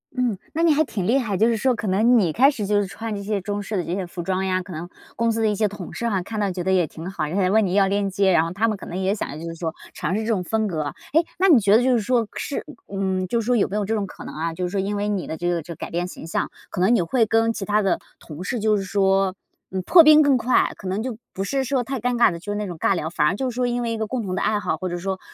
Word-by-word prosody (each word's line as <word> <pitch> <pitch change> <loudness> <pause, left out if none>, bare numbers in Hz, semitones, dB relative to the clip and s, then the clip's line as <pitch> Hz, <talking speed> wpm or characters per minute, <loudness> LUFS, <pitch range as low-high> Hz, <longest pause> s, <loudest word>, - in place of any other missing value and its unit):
嗯， 245 -6 0 0.2
那 330 - 0
你 325 -3 +5
还 310 - +3
挺 195 -9 -3
厉 255 +6 +3
害。 220 -6 -2
就 220 - +4
是 230 -1 +1
说 255 +3 +2
可 215 - -4
能 225 +6 +4
你 180 -7 +2
开 265 - +5
始 220 -8 -3
就 205 +1 +2
是 195 - -3
穿 225 +3 -5
这 200 - -5
些 200 0 -2
中 205 +1 -3
式 210 +1 -5
的 180 - 0
这 170 - -4
些 190 -2 -3
服 175 0 -6
装 190 +1 -1
呀， 185 -1 0
可 185 - -11
能 170 +1 -6 0.3
公 230 0 +1
司 225 - -1
的 220 - +3
一 210 - 0
些 215 +1 +2
同 195 -3 -8
事 235 - -2
哈， 195 -4 0
看 220 +2 -5
到 200 -2 0
觉 180 -1 -4
得 190 - 0
也 180 -4 +3
挺 165 +5 -8
好， 195 - -2
人 160 - -4
家 195 - +2
也 185 - +2
问 220 0 +4
你 185 - -2
要 195 -1 +4
链 200 0 0
接， 195 0 +2
然 160 - +4
后 165 - -3
他 220 +4 +1
们 215 - -1
可 - - -10
能 175 - -5
也 190 +1 +1
想 155 -7 -5
就 165 - -6
是 165 - -7
说 165 -1 -3 0.2
尝 175 +5 -2
试 215 - 0
这 220 - -4
种 205 -6 0
风 220 +3 0
格。 155 -5 -2 0.3
诶， 325 +2 +4
那 380 +1 +4
你 285 - +7
觉 205 0 +4
得 235 - +4
就 260 - +3
是 240 - +3
说 235 0 +1
是 285 - -4 0.2
嗯， 190 -1 -1
就 230 +5 0
是 215 - -6
说 245 - +2
有 220 - +2
没 195 - -5
有 210 - 0
这 220 - -1
种 205 -2 -2
可 - - -11
能 - - -8
啊， 165 +2 -3
就 180 +2 -3
是 - - -2
说 195 - -2
因 200 +2 -1
为 205 +1 -1
你 195 -4 -2
的 160 - -4
这 175 0 -1
个 170 -2 0
这 170 +2 -8
改 - - -7
变 175 +1 -1
形 180 - -9
象， 165 - -2 0.2
可 - - -5
能 195 +7 +4
你 205 - +3
会 225 +8 +2
跟 225 +1 +2
其 210 -3 -4
他 210 +1 +2
的 195 -2 +1 0.2
同 155 +2 -9
事 240 +4 -2
就 215 0 +2
是 195 - -2
说， 195 0 +2 0.4
嗯 190 - -2
破 350 - +8
冰 310 0 +8
更 280 -3 +4
快。 245 +2 +2
可 190 - -8
能 190 +3 -1
就 245 -3 -4 0.2
不 195 - -3
是 270 +7 -1
说 260 -1 0
太 265 0 -4
尴 245 +1 0
尬 235 -3 +5
的， 170 - -6
就 205 +4 -6
是 - - -3
那 210 - -2
种 175 -3 -6
尬 190 - +2
聊。 160 -1 -3
反 150 -3 +1
而 190 - +1
就 260 +3 -2
是 235 - -7
说 250 0 +1
因 245 0 -1
为 235 -1 -2
一 225 - -2
个 220 - -2
共 240 0 -3
同 185 -2 -3
的 - - -1
爱 210 -1 +1
好， - - -1
或 185 - -4
者 175 - -3
说 190 +1 -3
205 Hz, 370 characters per minute, -23 LUFS, 185-230 Hz, 0.4 s, 破